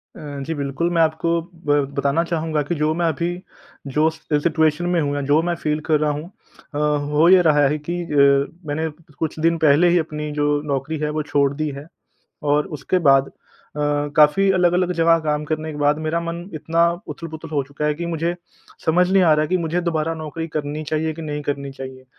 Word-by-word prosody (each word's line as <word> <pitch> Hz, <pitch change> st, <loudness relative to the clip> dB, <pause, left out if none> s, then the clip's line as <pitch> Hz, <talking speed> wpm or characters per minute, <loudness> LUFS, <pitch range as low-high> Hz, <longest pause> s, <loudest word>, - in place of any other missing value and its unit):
अ, -, -, -11 dB, 0.2 s
जी, 160 Hz, -, -3 dB
बिल्कुल, 145 Hz, +4 st, -2 dB
मैं 165 Hz, -, +3 dB
आपको 160 Hz, +1 st, +1 dB, 0.4 s
ब 145 Hz, -, +3 dB, 0.2 s
बताना 140 Hz, +4 st, +2 dB
चाहूँगा 160 Hz, -2 st, -1 dB
की 175 Hz, -, 0 dB
जो 155 Hz, 0 st, +1 dB
मैं -, -, +2 dB
अभी 165 Hz, +2 st, -1 dB, 0.7 s
जो 155 Hz, +1 st, +4 dB
सिचुएशन 160 Hz, +1 st, 0 dB
में -, -, +3 dB
हूँ, 145 Hz, 0 st, -1 dB
जो 145 Hz, +3 st, +3 dB
मैं 175 Hz, 0 st, -1 dB
फ़ील 150 Hz, -1 st, -1 dB
कर 155 Hz, -1 st, +4 dB
रहा 150 Hz, -1 st, +1 dB
हूँ। 145 Hz, +1 st, -4 dB, 0.5 s
अ, -, -, -1 dB, 0.3 s
हो 155 Hz, +3 st, +4 dB
ये 185 Hz, -1 st, +7 dB
रहा 150 Hz, -3 st, +4 dB
है 150 Hz, +2 st, 0 dB
कि 170 Hz, +4 st, -5 dB
अ, 140 Hz, -2 st, +3 dB, 0.2 s
मैंने 160 Hz, +2 st, -1 dB, 0.3 s
कुछ 160 Hz, -1 st, -3 dB
दिन 165 Hz, +1 st, +2 dB
पहले 155 Hz, +2 st, +4 dB
ही 175 Hz, -, +4 dB
अपनी 150 Hz, -1 st, -4 dB
जो 145 Hz, 0 st, +1 dB
नौकरी 140 Hz, +4 st, -2 dB
है 150 Hz, -, 0 dB
वो 155 Hz, 0 st, -2 dB
छोड़ 140 Hz, -1 st, +3 dB
दी 155 Hz, +1 st, -2 dB
है। 145 Hz, -, -9 dB, 0.7 s
और 150 Hz, 0 st, +2 dB
उसके 185 Hz, +6 st, 0 dB
बाद 135 Hz, 0 st, +5 dB
अ, -, -, -19 dB, 0.8 s
काफ़ी 155 Hz, +6 st, +5 dB
अलग-अलग 180 Hz, 0 st, +2 dB
जगह 165 Hz, 0 st, +4 dB
काम 150 Hz, 0 st, 0 dB
करने 155 Hz, +1 st, -3 dB
के 150 Hz, -, -8 dB
बाद 145 Hz, +1 st, +2 dB
मेरा 170 Hz, +2 st, 0 dB
मन 170 Hz, 0 st, -4 dB
इतना 165 Hz, +2 st, +2 dB, 0.2 s
उथल-पुथल 165 Hz, -1 st, -7 dB
हो 140 Hz, -, +2 dB
चुका 145 Hz, +1 st, -5 dB
है 150 Hz, -, +1 dB
कि 170 Hz, +3 st, -5 dB
मुझे 170 Hz, +1 st, -1 dB, 0.5 s
समझ 180 Hz, +3 st, +3 dB
नहीं 190 Hz, 0 st, +4 dB
आ 165 Hz, -3 st, +5 dB
रहा 155 Hz, 0 st, +1 dB
की 185 Hz, -, +1 dB
मुझे 170 Hz, +1 st, -1 dB
दोबारा 160 Hz, +1 st, -1 dB
नौकरी 160 Hz, +1 st, -5 dB
करनी 150 Hz, 0 st, -4 dB
चाहिए 155 Hz, +1 st, -1 dB
कि 165 Hz, -, -8 dB
नहीं 150 Hz, -1 st, -4 dB
करनी 140 Hz, -1 st, -3 dB
चाहिए। 130 Hz, -1 st, -9 dB
155 Hz, 205 wpm, -21 LUFS, 145-165 Hz, 0.8 s, ये